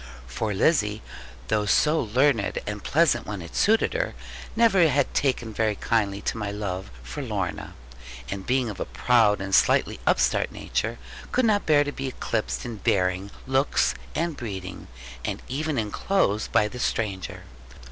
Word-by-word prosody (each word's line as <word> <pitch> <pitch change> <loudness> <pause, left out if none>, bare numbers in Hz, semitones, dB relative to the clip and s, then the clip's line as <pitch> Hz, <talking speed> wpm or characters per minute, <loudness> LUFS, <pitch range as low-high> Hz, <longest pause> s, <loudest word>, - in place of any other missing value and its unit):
For 85 - -3
Lizzie, 105 - +2 0.5
though 105 -1 +1
so 155 +10 +3
learned, 120 -1 +2
and 105 -1 -5
pleasant 145 -6 +2
when 100 -2 -4
it 85 - -11
suited 220 +2 +3
her, - - -2 0.4
never 220 -7 +5
had 140 0 +1
taken 125 -5 0
very 110 0 +1
kindly 100 -2 0
to 115 - -2
my 105 -1 -2
love 100 - -4
for - - -6
Lorna, - - -4 0.5
and 95 +7 -5
being 125 +3 +1
of 95 - -10
a - - -2
proud 115 -5 +3
and 95 0 -5
slightly - - +3
upstart - - +2
nature, - - -2 0.3
could 255 - +2
not 210 -2 +2
bear 150 -2 +5
to 145 - -3
be 135 -1 -4
eclipsed 115 -3 -3
in 120 -2 -5
bearing, 95 0 0 0.2
looks, 135 +2 +2 0.2
and 165 0 -1
breeding, 95 -7 -6 0.4
and - - -4
even 150 +2 -2
in 105 -2 -1
clothes, 110 - +1
by 105 - +3
the 125 +3 -8
stranger. 100 -6 -2
115 Hz, 160 wpm, -25 LUFS, 100-145 Hz, 0.5 s, never